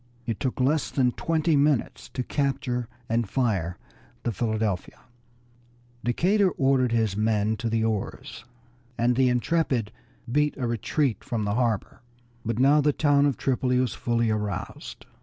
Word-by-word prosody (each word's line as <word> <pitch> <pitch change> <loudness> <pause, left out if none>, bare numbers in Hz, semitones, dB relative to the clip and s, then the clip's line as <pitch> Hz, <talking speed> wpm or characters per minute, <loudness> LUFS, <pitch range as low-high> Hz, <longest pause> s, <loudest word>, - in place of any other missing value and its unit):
It 115 -4 -3
took 130 -2 -2
less 145 +4 +2
than 125 -3 +2
twenty 160 +3 +1
minutes 145 -3 +1
to 125 - -1
capture 130 -3 -1 0.2
and 115 -2 0
fire 95 -10 0 0.5
the 120 - 0
Philadelphia. 110 -3 -2 1.0
Decatur 185 - +2
ordered 135 -5 +2
his 110 -4 +1
men 110 0 +1
to 115 +2 -2
the 110 0 +1
oars, 110 -1 -3 0.5
and 120 +1 +2
the 130 0 +4
Intrepid 125 -3 0 0.4
beat 150 +2 +1
a 130 - -2
retreat 120 +1 -1
from 110 -3 -2
the 100 - 0
harbor. 115 -3 -1 0.4
But 115 0 -2
now 140 +4 +5
the 145 0 +2
town 145 -1 +3
of 140 - -1
Tripoli 125 -1 +1
was 125 -2 +1
fully 115 -1 0
aroused. 105 -3 -4
120 Hz, 145 wpm, -26 LUFS, 110-140 Hz, 1.0 s, now